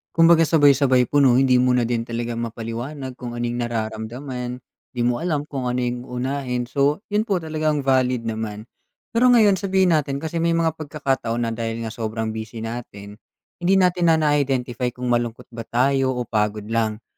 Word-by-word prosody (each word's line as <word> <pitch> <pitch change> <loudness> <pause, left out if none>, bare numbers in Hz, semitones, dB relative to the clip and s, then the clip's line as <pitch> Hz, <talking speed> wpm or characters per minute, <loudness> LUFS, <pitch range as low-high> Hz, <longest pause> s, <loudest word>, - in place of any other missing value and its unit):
Kumbaga 165 -1 +6
sabay-sabay 140 -5 +4
po, 145 - +4
'no? 130 -3 +5
Hindi 130 -1 +4
mo 125 0 +3
na 125 - +2
din 115 0 -2
talaga 115 0 -3
ma'paliwanag 120 +4 -5
kung 120 -1 -6
ano 120 - -3
yung 120 0 -2
nararamdaman. 120 +3 -4 0.3
Di 120 - 0
mo 120 0 +1
alam 155 -3 -1
kung 135 -4 -4
ano 125 - -1
yung 125 +1 -3
uunahin. 125 0 -2
So, 145 +6 +1
yon 215 +2 +1
po 200 - +1
talagang 155 -2 -1
valid 130 -3 +2
naman. 110 -2 -4 0.5
Pero 235 +2 +3
ngayon 215 -6 +5
sabihin 190 -2 +2
natin, 140 -2 0
kasi 165 +1 -3
may 165 0 +2
mga 165 -1 +2
pagkakataon 135 -6 -2
na 115 - -1
dahil 115 0 -3
nga 110 - -4
sobrang 110 -1 -3
busy 110 0 -6
natin, 105 -3 -8 0.4
hindi 180 +2 +2
natin 180 -2 +3
na 165 - +6
na-identify 135 -5 0
kung 125 -1 -3
malungkot 120 0 -2
ba 115 -2 -8
tayo 130 +1 +1
o 125 - -2
pagod 105 -2 -1
lang. 110 -1 -1
125 Hz, 180 wpm, -22 LUFS, 115-150 Hz, 0.5 s, Kumbaga